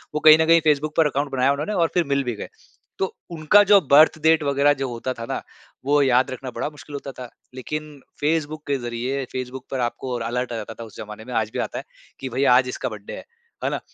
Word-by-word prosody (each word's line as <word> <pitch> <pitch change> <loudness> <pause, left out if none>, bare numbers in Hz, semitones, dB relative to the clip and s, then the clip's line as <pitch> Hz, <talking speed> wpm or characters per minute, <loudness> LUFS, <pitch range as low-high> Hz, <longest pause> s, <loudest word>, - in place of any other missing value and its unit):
वो 150 - +1
कहीं 155 0 +10
न - - +3
कहीं 165 0 +6
फेसबुक 150 0 +1
पर 160 - +5
अकाउंट 140 0 -2
बनाया 135 +1 +2
उन्होंने 150 +9 -2
और 170 -3 +2
फिर 175 - +2
मिल 140 0 +1
भी 120 -2 -2
गए। - - -7 0.5
तो 190 - +2 0.3
उनका 170 +6 +5
जो 205 - +8
बर्थ 155 +2 +7
डेट 160 -1 +4
वगैरह 140 +1 +3
जो 135 - 0
होता 120 +2 -4
था 115 - -7
ना, - - -2 0.4
वो 145 +1 +3
याद 130 -1 +3
रखना 130 0 -6
बड़ा 145 - -3
मुश्किल 150 -1 -13
होता 140 -1 -6
था। 125 -2 -9 0.3
लेकिन 150 +2 -6 0.2
फेसबुक 155 0 -1
के 140 -1 +1
ज़रिए 125 +3 -3
फेसबुक 130 0 -6
पर 135 - -2
आपको 125 +1 -2
र - - -6
अलर्ट 120 +1 -2
आ - - -3
जाता 110 0 -6
था 115 - -9
उस 110 -3 -13
ज़माने 105 +1 -9
में, 125 - -8
आज 110 -1 0
भी - - -3
आता - - -3
है - - -5 0.4
कि 135 - -5
भई, 130 +3 -1
आज 125 -1 +5
इसका 130 - -3
बर्थडे 105 -2 -9
है। - - -9 0.4
है - - +1
ना? - - -2
135 Hz, 250 wpm, -23 LUFS, 125-150 Hz, 0.5 s, कहीं